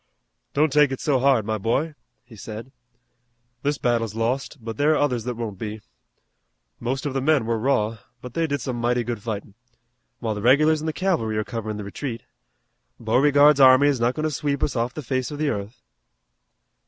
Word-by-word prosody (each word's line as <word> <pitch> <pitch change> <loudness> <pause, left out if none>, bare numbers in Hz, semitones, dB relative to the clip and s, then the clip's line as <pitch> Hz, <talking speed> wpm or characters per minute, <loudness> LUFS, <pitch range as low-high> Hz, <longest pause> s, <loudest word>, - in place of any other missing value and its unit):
"Don't 150 0 +2
take 150 -2 +5
it 135 - -3
so 140 -4 +1
hard, 130 -5 +3
my 110 0 -2
boy," 135 +10 0 0.3
he 120 -2 -14
said. 110 +4 -8 0.9
"This 145 +1 0
battle's 115 -4 0
lost, 125 +6 -2
but 115 -1 -7
there 150 +2 +3
are - - +2
others 125 -6 0
that 125 -1 -3
won't 110 -5 -5
be. 110 0 -5 1.0
Most 130 +4 -3
of 145 - -2
the 135 - -1
men 145 -3 +2
were 115 0 0
raw, 115 -3 0 0.2
but 125 -1 -10
they 165 +2 0
did 145 -1 -2
some 130 -3 -3
mighty 120 0 +1
good 115 -2 -4
fightin', 105 -2 -5 0.6
while 110 -2 -2
the 105 - -5
regulars 150 +6 +4
an' 160 - -4
the - - +1
cavalry 120 - -1
are 110 - 0
coverin' 110 -2 -5
the 105 - -5
retreat. 115 +3 -5 0.8
Beauregard's 145 +5 +4
army 130 +2 +7
is 140 -4 0
not 120 +2 +1
goin' 155 - -3
to 155 - 0
sweep 140 -1 -2
us 145 - 0
off 120 +1 -1
the 155 - -5
face 130 0 -2
of 145 - -6
the 150 0 0
earth." 110 +1 -5
125 Hz, 200 wpm, -23 LUFS, 115-145 Hz, 1.0 s, army